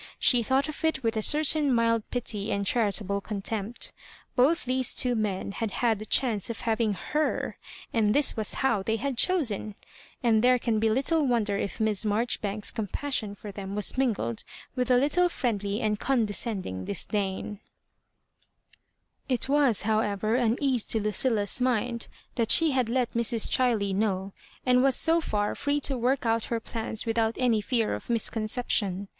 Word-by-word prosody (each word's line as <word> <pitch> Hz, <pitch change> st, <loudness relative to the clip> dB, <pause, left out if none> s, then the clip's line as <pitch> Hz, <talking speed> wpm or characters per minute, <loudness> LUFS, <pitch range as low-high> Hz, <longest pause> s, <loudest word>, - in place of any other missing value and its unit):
She 245 Hz, -2 st, +5 dB
thought 265 Hz, +5 st, +1 dB
of 305 Hz, +1 st, -6 dB
it 320 Hz, -5 st, 0 dB
with 225 Hz, 0 st, 0 dB
a 220 Hz, -, 0 dB
certain 300 Hz, +2 st, +4 dB
mild 230 Hz, -1 st, +2 dB
pity 225 Hz, -4 st, -2 dB
and 200 Hz, 0 st, -1 dB
charitable 200 Hz, -2 st, +1 dB
contempt 210 Hz, +2 st, -4 dB, 0.4 s
Both 285 Hz, +6 st, +3 dB
these 255 Hz, 0 st, 0 dB
two 250 Hz, -1 st, +2 dB
men 210 Hz, -4 st, -2 dB
had 225 Hz, +2 st, -3 dB
had 225 Hz, 0 st, 0 dB
the 215 Hz, -, -7 dB
chance 230 Hz, -7 st, +1 dB
of 230 Hz, -, -5 dB
having 220 Hz, -2 st, 0 dB, 0.2 s
her^ 305 Hz, +1 st, 0 dB, 0.4 s
and 215 Hz, -3 st, +2 dB
this 290 Hz, -1 st, +3 dB
was 220 Hz, -2 st, -1 dB
how 230 Hz, -7 st, +2 dB
they 220 Hz, +3 st, -1 dB
had 270 Hz, +4 st, -3 dB
chosen 230 Hz, -, 0 dB, 0.5 s
1 -, -, -35 dB
And 225 Hz, -2 st, +3 dB
there 250 Hz, 0 st, +5 dB
can 230 Hz, -3 st, -1 dB
be 220 Hz, +1 st, +2 dB
little 275 Hz, +6 st, +1 dB
wonder 220 Hz, -5 st, +1 dB
if 200 Hz, -, -4 dB
Miss 220 Hz, -2 st, 0 dB
Marjoribaoks's 210 Hz, -1 st, -1 dB
compassion 220 Hz, -1 st, -3 dB
for 205 Hz, +1 st, -9 dB
them 195 Hz, 0 st, -7 dB
was 210 Hz, -1 st, 0 dB
mingled 215 Hz, -, -1 dB, 0.3 s
with 250 Hz, 0 st, -1 dB
a 250 Hz, -, +5 dB
little 315 Hz, +7 st, +2 dB
friendly 210 Hz, -, -2 dB
and 210 Hz, -2 st, 0 dB
condescending 210 Hz, -, -1 dB
disdam. 200 Hz, +1 st, -3 dB, 1.7 s
It 255 Hz, -1 st, +1 dB
was, 275 Hz, -6 st, +3 dB
however, 215 Hz, -1 st, 0 dB
an 240 Hz, -1 st, +2 dB
ease 260 Hz, -6 st, +1 dB
to 225 Hz, -, +3 dB
Lucilla's 210 Hz, +2 st, +1 dB
mind 240 Hz, -1 st, -1 dB, 0.3 s
that 230 Hz, -2 st, -1 dB
she 325 Hz, -2 st, +5 dB
had 255 Hz, -4 st, 0 dB
let 250 Hz, 0 st, 0 dB
Mrs. 235 Hz, -1 st, +2 dB
Chiley 225 Hz, -6 st, +1 dB
know, 195 Hz, -1 st, -1 dB, 0.3 s
and 250 Hz, 0 st, +4 dB
was 270 Hz, -1 st, +3 dB
so 330 Hz, +1 st, +3 dB
far 205 Hz, -8 st, -1 dB
free 290 Hz, 0 st, -1 dB
to 270 Hz, -, 0 dB
work 250 Hz, +2 st, 0 dB
out 225 Hz, 0 st, +1 dB
her 235 Hz, -, -2 dB
plans 225 Hz, 0 st, -4 dB
without 225 Hz, 0 st, 0 dB
any 235 Hz, -4 st, +2 dB
fear 230 Hz, 0 st, 0 dB
of -, -, -7 dB
misconception. 215 Hz, -4 st, 0 dB
225 Hz, 170 wpm, -27 LUFS, 210-255 Hz, 1.7 s, She